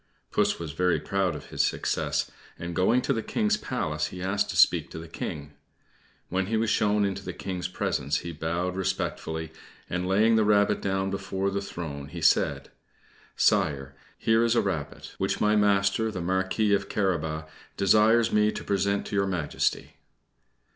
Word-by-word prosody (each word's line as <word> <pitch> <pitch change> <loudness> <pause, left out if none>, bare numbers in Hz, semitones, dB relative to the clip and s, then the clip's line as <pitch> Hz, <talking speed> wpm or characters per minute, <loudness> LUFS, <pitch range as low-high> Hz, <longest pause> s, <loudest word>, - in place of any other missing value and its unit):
Puss - - +2
was 80 -3 -5
very 90 +3 +1
proud 95 -4 -1
of 75 - -10
his - - +1
success, - - -1 0.3
and, 85 0 -6
going 115 +7 +3
to 140 - +1
the 115 - -1
King's 215 - +1
palace, 80 - -2
he 90 - -9
asked 100 +2 0
to - - -4
speak - - +4
to - - -9
the 80 +1 -8
King. 75 -2 -6 0.7
When 95 +1 -1
he 110 +2 0
was 110 0 +1
shown 105 -1 +2
into 100 -1 -3
the - - -5
King's 90 -2 -4
presence 70 -5 -1
he 85 - -4
bowed 85 +3 -2
respectfully, 85 -4 -3 0.4
and, 90 0 -2
laying 110 +4 +4
the 110 - +4
rabbit 105 -1 +3
down 95 0 -1
before 95 0 -2
the 100 0 -2
throne, 75 -7 -6
he - - -8
said - - +2 0.6
"Sire, 70 -1 +1 0.2
here 115 +1 +3
is 115 0 +2
a - - +4
rabbit, 85 -8 -4
which - - 0
my 105 0 +3
master, 100 +1 +2
the 100 -4 -5
Marquis 95 +4 +1
of 100 -1 0
Carabas, 80 -6 -1 0.3
desires 110 +4 +4
me 105 0 +4
to - - -6
present 100 0 0
to - - -5
your 100 -1 +2
Majesty." 90 -6 -2
95 Hz, 175 wpm, -27 LUFS, 85-105 Hz, 0.7 s, speak